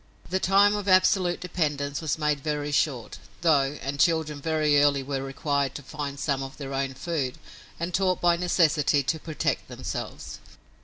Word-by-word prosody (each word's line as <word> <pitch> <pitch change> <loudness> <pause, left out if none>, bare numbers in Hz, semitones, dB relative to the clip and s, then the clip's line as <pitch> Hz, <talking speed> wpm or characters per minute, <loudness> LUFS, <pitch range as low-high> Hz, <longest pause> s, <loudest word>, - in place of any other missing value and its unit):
The 190 - +1
time 200 +2 +4
of 205 -1 -4
absolute 185 -1 +4
dependence 145 -5 -2
was 160 -1 -1
made 150 -2 0
very 150 0 -2
short, 140 -5 -1 0.2
though, 145 -3 +2
and 140 +1 -4
children 155 -1 +1
very 155 -2 +2
early 140 -2 +3
were 135 0 -3
required 140 0 -1
to 145 - -7
find 140 0 -6
some 140 -2 -1
of 135 0 -7
their 140 -2 -6
own 135 0 -2
food, 140 -5 -3 0.4
and 170 +2 -3
taught 185 0 +1
by 175 -1 +4
necessity 160 -5 +2
to 145 +5 -1
protect 155 -1 -2
themselves. - - -6
150 Hz, 165 wpm, -26 LUFS, 140-170 Hz, 0.4 s, time